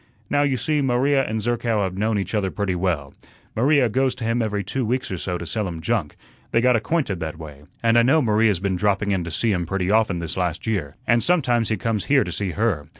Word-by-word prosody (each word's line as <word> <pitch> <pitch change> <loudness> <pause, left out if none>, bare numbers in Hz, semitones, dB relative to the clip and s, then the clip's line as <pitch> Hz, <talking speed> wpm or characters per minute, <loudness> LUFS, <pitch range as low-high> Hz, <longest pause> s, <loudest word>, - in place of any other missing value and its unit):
Now, 145 - +3
you 140 -3 +1
see, 150 +5 0
Maria 135 +1 +2
and 110 0 -3
Zerkow 115 -2 0
have 95 -1 -3
known 105 +2 0
each 95 0 -3
other 100 -3 0
pretty 100 -1 -2
well. 85 -6 -2 0.4
Maria 135 +2 +3
goes 130 +3 0
to 125 - -7
him 115 +1 0
every 105 -2 -1
two 130 +7 -2
weeks 130 +3 -2
or 95 - -2
so 90 0 -3
to 85 - -7
sell 105 +4 -2
him 85 -2 -6
junk; 95 -4 -1 0.3
they - - +2
got 125 +1 +4
acquainted 115 - -1
that 80 -1 -5
way, 75 -3 -11 0.2
and 115 0 +5
I - - +6
know 135 +7 +4
Maria's 110 - +2
been 95 0 -1
dropping 100 +1 +1
in 95 -3 0
to - - -5
see 110 +7 0
him 90 -4 -1
pretty 95 0 -1
often 110 -4 +2
this 85 +1 -4
last 90 -1 -2
year, 90 -11 -2
and 120 0 +3
sometimes 125 -10 +2
he 110 - 0
comes 110 0 -2
here 140 -2 +4
to - - -6
see 100 -2 -2
her. 100 -10 -1
105 Hz, 245 wpm, -22 LUFS, 90-120 Hz, 0.4 s, I